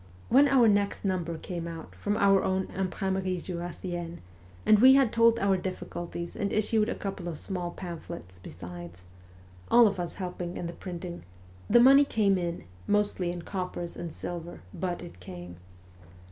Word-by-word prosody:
When 275 +4 +6
our 265 -4 +5
next 205 -1 +1
number 175 -4 -1
came 170 0 -5
out 165 -1 -8
from 205 +1 -2
our 195 -2 +4
own 190 0 0
Imprimerie 190 0 -1
Jurassienne, 175 -1 -5 0.5
and 215 - +6
we 260 +3 +8
had 270 -5 +4
told 230 0 +5
our 200 -3 +2
difficulties 175 -2 -5
and 200 - -2
issued 215 +1 +2
a - - -2
couple 195 -3 -5
of 165 -3 -4
small 180 -1 -3
pamphlets 170 - -8
besides 90 0 -9 0.7
all 240 0 +7
of 200 -3 +1
us 175 -1 -4
helping 180 -2 -5
in - - -4
the 170 - -4
printing 175 -1 -7 0.5
the 240 - +7
money 270 +4 +8
came 205 -8 +2
in, 170 -1 -3 0.2
mostly 205 -4 +1
in 175 -1 -6
coppers 180 -3 -4
and 170 - -5
silver, 170 +1 -6
but 180 -2 -3
it 170 - -11
came. 90 -1 -9
180 Hz, 160 wpm, -28 LUFS, 170-205 Hz, 0.7 s, we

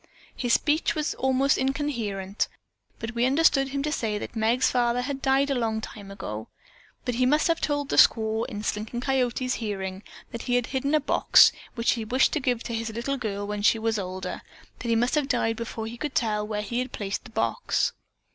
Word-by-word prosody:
His 245 -2 0
speech 310 +2 +2
was 305 -1 -1
almost 265 +1 +2
incoherent, 235 -8 -1 0.5
but 225 - -5
we 240 +1 +2
understood 275 -1 +4
him 275 0 -3
to 300 - -1
say 220 -7 -1
that 210 - -7
Meg's 230 +3 +2
father 245 0 +2
had 275 +1 -4
died 275 +1 +2
long 225 -4 -1
ago. 195 - -7 0.6
He 250 0 +1
must 300 +5 +3
have 330 -1 +1
told 290 -1 -1
the - - 0
squaw 220 0 +4
in 210 0 -6
Slinking 215 +3 -3
Coyote's 255 -1 0
hearing 190 -3 -4 0.3
that 235 - -5
he 245 - 0
had 245 -1 +2
hidden 275 +4 0
a - - +5
box 290 - +6 0.2
which 230 -1 +2
he 230 - -1
wished 255 +5 +2
given 250 -6 0
to 235 - -4
his 225 0 -2
little 240 +5 -2
girl 205 -5 -3
when 205 0 -3
she 205 +2 +4
was 225 -1 0
older, 185 0 -5 0.4
but 245 - -5
he 230 - +3
must 240 +2 +1
have 295 -3 +1
died 240 -4 +1
before 225 -1 -5
he 230 +2 -7
could 295 +2 -4
tell 210 -3 0
where 210 -1 -2
he 235 +3 -2
had 255 +1 -3
placed 200 -1 -4
the - - -10
box." - - 0
235 Hz, 200 wpm, -26 LUFS, 220-270 Hz, 0.6 s, box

